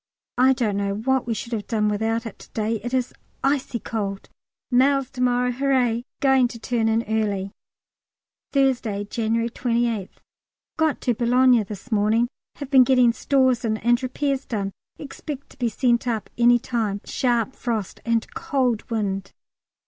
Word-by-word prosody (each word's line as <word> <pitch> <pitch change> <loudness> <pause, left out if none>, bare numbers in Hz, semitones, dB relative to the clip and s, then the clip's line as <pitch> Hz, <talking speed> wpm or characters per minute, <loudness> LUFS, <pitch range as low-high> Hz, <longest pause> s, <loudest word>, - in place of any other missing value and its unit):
I 260 +1 +6
don't 220 -6 -1
know 200 0 -1
what 260 +4 0
we 230 - 0
should 235 +2 -6
have 210 -3 -3
done 215 -2 +1
without 225 +3 0
it 225 - -8
to - - -14
day; 220 +1 -1
it 240 +3 -6
is 255 -1 -1 0.3
icy 270 -2 0
cold. 200 -4 -4 0.4
Mails 270 +1 +3
to 255 - -6
morrow, 250 0 +2
hurrah! 250 -3 +1 0.2
Going 265 -2 +4
to 240 - -9
turn 230 0 -1
in 225 +1 +1
early. 205 -3 -1 1.0
Thursday, 250 -7 +1
January 230 +2 -1
28th. 235 -5 -1 0.6
Got 315 -2 +1
to 245 - +1
Boulogne 245 0 +4
this 210 +4 -9
morning. 220 +3 +2 0.3
Have 285 -2 -8
been 260 -2 +8
getting 250 -2 +4
stores 260 -2 +2
in 220 -2 0
and 240 +2 +2
repairs 270 +1 -2
done; 200 -4 -2 0.3
expect 285 0 -8
to - - -18
be 240 -2 +1
sent 240 +1 +1
up 225 -3 -2
any 240 0 +5
time. 220 -4 -2
Sharp 240 -1 0
frost 225 -6 -3
and 230 -1 +1
cold 250 -5 -1
wind. 195 -4 -2
235 Hz, 160 wpm, -23 LUFS, 220-255 Hz, 1.0 s, been